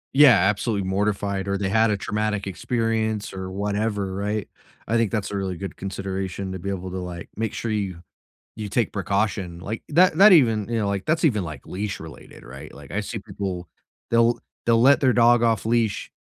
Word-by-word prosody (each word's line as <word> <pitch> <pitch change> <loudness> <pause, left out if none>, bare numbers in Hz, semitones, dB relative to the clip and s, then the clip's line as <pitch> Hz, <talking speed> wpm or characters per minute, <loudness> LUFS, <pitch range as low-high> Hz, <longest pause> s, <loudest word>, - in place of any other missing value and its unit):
Yeah, 135 -6 +8
absolutely 100 -1 0
mortified 100 0 -1
or 100 0 0
they 95 -1 -1
had 110 +2 +3
a 105 - +1
traumatic 105 0 -2
experience, 110 +1 -1
or 95 -1 -5
whatever, 100 0 -2
right? 105 +1 -2 0.4
I 115 - 0
think 115 -3 +2
that's 105 -3 -2
a - - -3
really 95 -3 -3
good 100 +2 -6
consideration 95 0 -4
to 95 - -5
be 100 - -4
able 95 -1 -4
to, 95 - -4
like, 90 -1 -7
make 110 0 -2
sure 115 - -3
you 95 -5 -3 0.6
you 105 -1 -4
take 120 0 0
precaution, 100 -3 -1
like, 110 +4 -5
that 170 +1 +4
that 200 +1 +9
even, 115 - +4
you 115 -1 -1
know, 105 -2 0
like, 100 -1 -2
that's 165 +2 0
even, 105 - +1
like, 75 -5 -8
leash-related, 95 -4 -7
right? 65 +3 -10
Like, 70 0 -13
I 100 - -1
see 110 +1 -5
people 95 -4 -5 0.4
they'll 115 0 +3 0.2
they'll 115 -1 +4
let 135 +2 +6
their 130 -2 +4
dog 120 0 +5
off 115 -3 +1
leash, 115 -2 0
105 Hz, 195 wpm, -24 LUFS, 95-115 Hz, 0.6 s, that